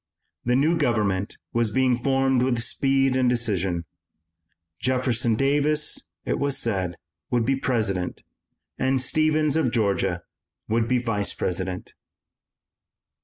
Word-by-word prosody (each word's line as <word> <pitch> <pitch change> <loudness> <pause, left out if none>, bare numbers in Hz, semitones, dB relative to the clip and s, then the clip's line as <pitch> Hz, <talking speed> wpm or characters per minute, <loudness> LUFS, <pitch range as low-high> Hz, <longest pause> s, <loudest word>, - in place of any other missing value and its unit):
The 125 +1 +2
new 155 +6 +2
government 100 -4 0 0.2
was 115 -2 +1
being 130 +2 +2
formed 135 0 +1
with 125 -2 +1
speed 135 +2 +1
and 130 -1 +3
decision. 95 -8 0 0.9
Jefferson 125 -3 +1
Davis, 145 +4 +2 0.2
it - - -1
was 140 -1 0
said, 95 -8 -1 0.3
would 120 -2 +1
be 135 +3 +2
President, 110 -9 -1 0.6
and 130 0 +2
Stephens 155 +2 +2
of 155 -7 +2
Georgia 100 -6 0 0.4
would 115 +1 +1
be 125 +1 +2
Vice 115 -5 -1
President. 90 0 -3
125 Hz, 120 wpm, -24 LUFS, 105-135 Hz, 0.9 s, and